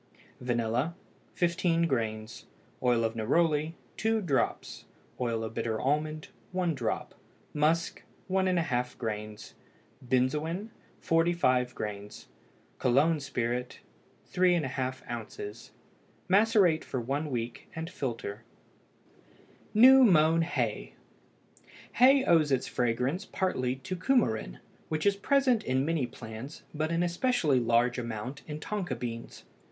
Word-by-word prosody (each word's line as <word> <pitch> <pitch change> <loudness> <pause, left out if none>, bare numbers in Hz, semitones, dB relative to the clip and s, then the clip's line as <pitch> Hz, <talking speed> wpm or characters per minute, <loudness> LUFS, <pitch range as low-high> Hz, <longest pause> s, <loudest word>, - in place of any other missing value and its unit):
Vanilla 120 +5 -1 0.4
15 170 -1 +1
grains. 110 -6 -3 0.3
Oil 120 -2 +2
of 115 0 0
neroli 155 +7 +1 0.2
2 225 0 +1
drops. 145 - -1 0.3
Oil 115 -2 -1
of 110 - -5
bitter 110 -1 -2
almond 150 +3 -1 0.2
1 180 -2 +1
drop. 125 -6 -3 0.4
Musk 155 +3 +1 0.3
1½ 175 -10 0
grains. 105 -2 -5 0.5
Benzoin 150 - 0 0.3
45 165 -7 +2
grains. 105 -1 -6 0.5
Cologne 150 +6 +3
spirit 125 -3 -3 0.5
3½ 135 -8 0
oz. 115 -2 -7 0.6
Macerate 195 -4 +4
for 130 - -4
one 140 +6 -2
week, 120 -2 -4
and 160 0 -4
filter. 120 - -5 1.3
NEW 260 +4 +8
MOWN 165 -6 +5
HAY. 165 - -2 1.0
Hay 265 +2 +5
owes 160 -4 +4
its 130 -2 +1
fragrance 125 - -1
partly 130 -10 -1
to 185 +8 -6
cumarin, 175 - +1 0.3
which 155 -1 -2
is 200 -1 +4
present 255 +1 +2
in 130 +1 0
many 160 -5 0
plants, 115 +6 -9
but 155 +1 -1
in 170 +1 +1
especially 175 - +2
large 120 +1 +2
amount 120 +4 -5
in 150 -1 -5
tonka 190 -7 -3
beans. 115 -1 -6
145 Hz, 110 wpm, -29 LUFS, 120-170 Hz, 1.3 s, NEW